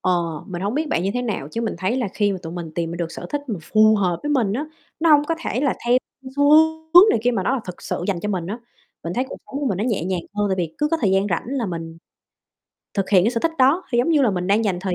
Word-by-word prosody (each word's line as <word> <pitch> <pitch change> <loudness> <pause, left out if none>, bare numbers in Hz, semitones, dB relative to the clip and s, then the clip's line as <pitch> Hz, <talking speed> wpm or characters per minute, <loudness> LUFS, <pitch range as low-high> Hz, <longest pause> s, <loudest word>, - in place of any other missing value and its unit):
ờ, 185 - +1 0.3
mình 185 -3 -6
hổng 205 +4 -1
biết 310 +2 -1
bạn 170 - 0
như 195 - 0
thế 245 - -1
nào, 210 - -3
chứ 230 - -3
mình 225 -3 -2
thấy 190 +7 0
là 245 -5 -1
khi 205 -2 +1
mà 190 - -4
tụi 165 - -7
mình 170 -2 -6
tìm 165 -1 -2
ra 170 - -5
được 170 -1 -3
sở - - -7
thích 290 - -1
mà 210 -6 -3
phù 215 +5 +4
hợp 180 -4 0
với 295 - -2
mình 240 -9 +1
á, 275 +8 -2 0.4
nó 330 0 +3
hông 295 -1 +6
có 330 - -1
thể 250 - -1
là 280 -2 +1
theo, 245 +1 +5 0.3
ưm, 260 - -8
xu 285 0 +4 0.4
hướng 365 +5 +10
này - - +2
kia 245 - +3
mà 230 -6 -1
nó 200 - 0
là 265 - -2
thực 180 - -9
sự - - -3
dành 190 -4 -1
cho 210 - -3
mình 180 -4 -2
á. 210 +6 -4 0.5
Mình 170 - -3
thấy 255 - 0
cuộc - - -7
sống 280 - -5
của 285 - -1
mình 195 -7 -1
nó 210 - 0
nhẹ 220 -9 -1
nhàng 185 -1 -1
hơn, 205 0 0
tại 190 - +1
vì 165 -3 -3
cứ 300 - +1
có 330 - +1
thời 200 - +2
gian 195 +1 +2
rảnh 170 - -1
là 260 -4 -2
mình 165 -2 -6 1.0
thực 195 -2 -1
hiện 185 -3 +5
cái 225 - +3
sở 235 -2 -2
thích 330 - +1
đó, 275 +8 +4
thì, 240 - +2
giống 245 - +2
như 310 -4 +4
là, 245 - +3
mình 180 -2 -2
đang 205 +4 +2
dành 190 -4 0
thời 185 -1 -2
210 Hz, 320 wpm, -22 LUFS, 180-255 Hz, 1.0 s, hướng